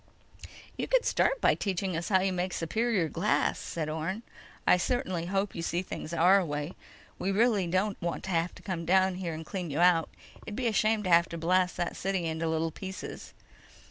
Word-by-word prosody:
"You -, -, -2 dB
could -, -, +3 dB
start -, -, +2 dB
by -, -, +5 dB
teaching 190 Hz, -2 st, -2 dB
us 165 Hz, +1 st, -3 dB
how 190 Hz, -2 st, +4 dB
you 190 Hz, 0 st, +1 dB
make 180 Hz, 0 st, -2 dB
superior 210 Hz, +1 st, 0 dB
glass," 175 Hz, +7 st, +1 dB
said 160 Hz, -2 st, -4 dB
Orne. 160 Hz, +8 st, -3 dB, 0.4 s
"I -, -, +6 dB
certainly 185 Hz, -5 st, -1 dB
hope 195 Hz, +1 st, -1 dB
you 170 Hz, -, -5 dB
see 175 Hz, +2 st, -1 dB
things 170 Hz, -, -6 dB
our 180 Hz, +4 st, +5 dB
way. 150 Hz, 0 st, -3 dB, 0.5 s
We 195 Hz, -, 0 dB
really 210 Hz, -3 st, +3 dB
don't 195 Hz, +4 st, 0 dB
want 170 Hz, -1 st, -3 dB
to 190 Hz, -, -4 dB
have 170 Hz, 0 st, 0 dB
to -, -, -14 dB
come 185 Hz, -6 st, -3 dB
down 185 Hz, +1 st, +3 dB
there 170 Hz, -4 st, -3 dB
and 160 Hz, +1 st, -7 dB
clean 180 Hz, 0 st, -4 dB
you 145 Hz, +2 st, -2 dB
out. 175 Hz, -2 st, +4 dB, 0.3 s
It'd 210 Hz, -, -7 dB
be 255 Hz, -, -2 dB
a 230 Hz, -, +2 dB
shame 215 Hz, 0 st, +2 dB
to 185 Hz, -, -2 dB
have 170 Hz, 0 st, +5 dB
to 170 Hz, -, -5 dB
blast 180 Hz, +2 st, +1 dB
that 175 Hz, -, -2 dB
city 190 Hz, -2 st, -1 dB
into 160 Hz, 0 st, -1 dB
little 160 Hz, 0 st, 0 dB
pieces." 190 Hz, +3 st, -8 dB
180 Hz, 205 wpm, -29 LUFS, 165-195 Hz, 0.5 s, I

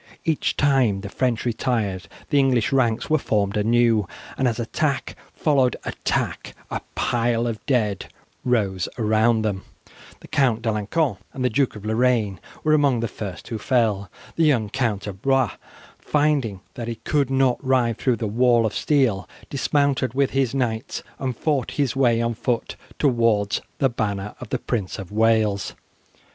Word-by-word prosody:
Each 160 Hz, -2 st, 0 dB
time 130 Hz, -9 st, +3 dB
the 100 Hz, -, -6 dB
French 125 Hz, +1 st, -1 dB
retired 110 Hz, -5 st, -1 dB, 0.2 s
the 145 Hz, -, +4 dB
English 130 Hz, -3 st, +2 dB
ranks 120 Hz, -3 st, +1 dB
were 155 Hz, -1 st, +2 dB
formed 100 Hz, -5 st, 0 dB
anew, 115 Hz, -1 st, +3 dB, 0.3 s
and 130 Hz, -, +1 dB
as 115 Hz, -1 st, -1 dB
attack 135 Hz, +4 st, -1 dB, 0.2 s
followed 135 Hz, -6 st, +2 dB
attack -, -, -2 dB, 0.2 s
a -, -, -2 dB
pile 120 Hz, 0 st, +1 dB
of 115 Hz, -2 st, -3 dB
dead 110 Hz, -8 st, 0 dB, 0.4 s
rose 100 Hz, -7 st, 0 dB
around 110 Hz, 0 st, +2 dB
them. 100 Hz, -3 st, -2 dB, 0.6 s
The -, -, -12 dB
Count 125 Hz, -5 st, +1 dB
D'Alencon 110 Hz, -, 0 dB, 0.2 s
and 130 Hz, -1 st, -2 dB
the 125 Hz, -, +2 dB
Duke 130 Hz, +2 st, +1 dB
of 105 Hz, 0 st, -9 dB
Lorraine 110 Hz, -4 st, +1 dB, 0.2 s
were 155 Hz, -, +3 dB
among 140 Hz, -6 st, +3 dB
the 115 Hz, -, 0 dB
first 95 Hz, -6 st, -7 dB
who 115 Hz, -3 st, -3 dB
fell. 105 Hz, -5 st, +1 dB, 0.3 s
The 165 Hz, -, +3 dB
young 120 Hz, -9 st, +2 dB
Count 110 Hz, -6 st, -1 dB
of 100 Hz, -2 st, -7 dB
Blois, 135 Hz, -4 st, +2 dB, 0.5 s
finding 145 Hz, -10 st, 0 dB
that 120 Hz, -2 st, -6 dB
he 120 Hz, -, -3 dB
could 140 Hz, +4 st, 0 dB
not 135 Hz, -1 st, +2 dB
ride 125 Hz, -4 st, +1 dB
through 125 Hz, -3 st, +2 dB
the 115 Hz, -, -4 dB
wall 120 Hz, +2 st, +3 dB
of 105 Hz, -, -1 dB
steel, 130 Hz, -10 st, +1 dB, 0.2 s
dismounted 140 Hz, -3 st, +1 dB
with 140 Hz, -1 st, +2 dB
his 135 Hz, -2 st, 0 dB
knights 120 Hz, -1 st, -2 dB, 0.2 s
and 130 Hz, -3 st, -3 dB
fought 145 Hz, -6 st, 0 dB
his 140 Hz, -4 st, +1 dB
way 120 Hz, -3 st, +3 dB
on 115 Hz, 0 st, 0 dB
foot 120 Hz, +1 st, -2 dB, 0.2 s
towards 115 Hz, -7 st, +2 dB, 0.2 s
the 135 Hz, -, +3 dB
banner 105 Hz, -4 st, -3 dB
of -, -, -8 dB
the -, -, 0 dB
Prince 100 Hz, -6 st, -3 dB
of 95 Hz, -1 st, -8 dB
Wales. 110 Hz, -2 st, +2 dB
120 Hz, 160 wpm, -23 LUFS, 110-135 Hz, 0.6 s, the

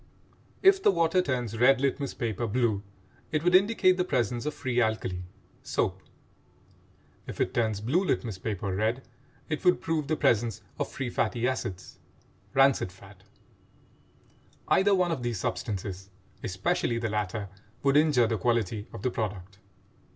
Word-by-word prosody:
If 385 Hz, 0 st, +6 dB
the -, -, +5 dB
water 170 Hz, -1 st, +3 dB
turns 125 Hz, -, -2 dB
red 130 Hz, +2 st, +5 dB
litmus 140 Hz, 0 st, -1 dB
paper 115 Hz, 0 st, -2 dB
blue, 110 Hz, -2 st, +1 dB, 0.5 s
it 155 Hz, 0 st, 0 dB
would 180 Hz, +1 st, +3 dB
indicate 190 Hz, -1 st, +4 dB
the 180 Hz, -, +2 dB
presence 120 Hz, -, -1 dB
of 150 Hz, -, -1 dB
free 125 Hz, -2 st, 0 dB
alkali 110 Hz, -5 st, -1 dB, 0.4 s
(soap); -, -, -1 dB, 1.3 s
if -, -, -7 dB
it -, -, 0 dB
turns 110 Hz, -3 st, 0 dB
blue 145 Hz, -, +1 dB
litmus 115 Hz, -, -1 dB
paper 100 Hz, -2 st, -3 dB
red, 110 Hz, +6 st, 0 dB, 0.4 s
it 155 Hz, -, -3 dB
would 180 Hz, -1 st, +4 dB
prove 160 Hz, -3 st, -1 dB
the 155 Hz, -, +1 dB
presence 115 Hz, -6 st, +1 dB, 0.2 s
of -, -, -1 dB
free 135 Hz, -3 st, -4 dB
fatty 120 Hz, +2 st, 0 dB
acids 100 Hz, -8 st, -4 dB, 0.6 s
(rancid 135 Hz, -8 st, +4 dB
fat). 95 Hz, +1 st, -16 dB, 1.5 s
Either 200 Hz, +1 st, +4 dB
one 180 Hz, -2 st, +1 dB
of 160 Hz, -, -2 dB
these 120 Hz, -4 st, -2 dB
substances, 95 Hz, -2 st, -4 dB, 0.3 s
especially 115 Hz, -, -1 dB
the 115 Hz, 0 st, -1 dB
latter, 105 Hz, -1 st, -3 dB, 0.3 s
would 140 Hz, 0 st, +3 dB
injure 145 Hz, -5 st, +5 dB
the 110 Hz, -2 st, -1 dB
quality 110 Hz, -1 st, 0 dB
of 115 Hz, -, -9 dB
the 125 Hz, -, +1 dB
product. 100 Hz, -4 st, -5 dB
120 Hz, 150 wpm, -28 LUFS, 105-150 Hz, 1.5 s, If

